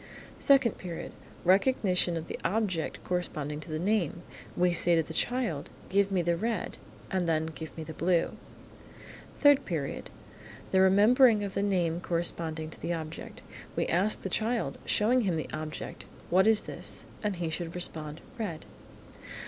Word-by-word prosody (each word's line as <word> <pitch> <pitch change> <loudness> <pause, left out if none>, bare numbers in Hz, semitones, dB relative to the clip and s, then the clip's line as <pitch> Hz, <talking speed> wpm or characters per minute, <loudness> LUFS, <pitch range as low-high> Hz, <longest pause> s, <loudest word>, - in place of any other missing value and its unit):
Second 275 -5 +4
Period. 175 -3 -6 0.3
Recognition 185 -3 +3
of 160 - -4
the - - -6
object 185 -3 -1
corresponding 150 -5 -3
to 155 - -10
the 155 - -2
name. 180 -2 0 0.3
We 180 0 +3
say 175 0 +4
to 165 - +3
the 160 - -8
child, 230 - -1 0.2
"Give 200 0 +2
me 185 -2 +1
the 170 0 +2
red," 225 +5 -2 0.3
and 185 -3 0
then, 160 -1 +2
"Give 160 0 -8
me 160 - -4
the 160 - -7
blue." 170 +1 +1 1.1
Third 285 -2 +6
Period. 155 -6 -4 0.6
The 190 - +4
remembering 210 +4 +6
of 200 -1 -4
the 200 - 0
name 175 -4 +1
corresponding 165 -2 -1
to - - -12
the 175 - -1
object. 160 -1 -7 0.3
We - - +1
ask 190 +5 +1
the - - -1
child, 225 +5 -1
showing 240 +4 +3
him 190 -6 0
the 155 - -5
object, 155 0 -6 0.3
"What 190 +3 +5
is 220 -1 +6
this?" - - -4 0.2
and 210 -2 -1
he 170 -2 -3
should 170 +1 -4
respond, 155 -3 -3 0.2
"Red." 170 -8 -4
175 Hz, 160 wpm, -29 LUFS, 160-205 Hz, 1.1 s, Third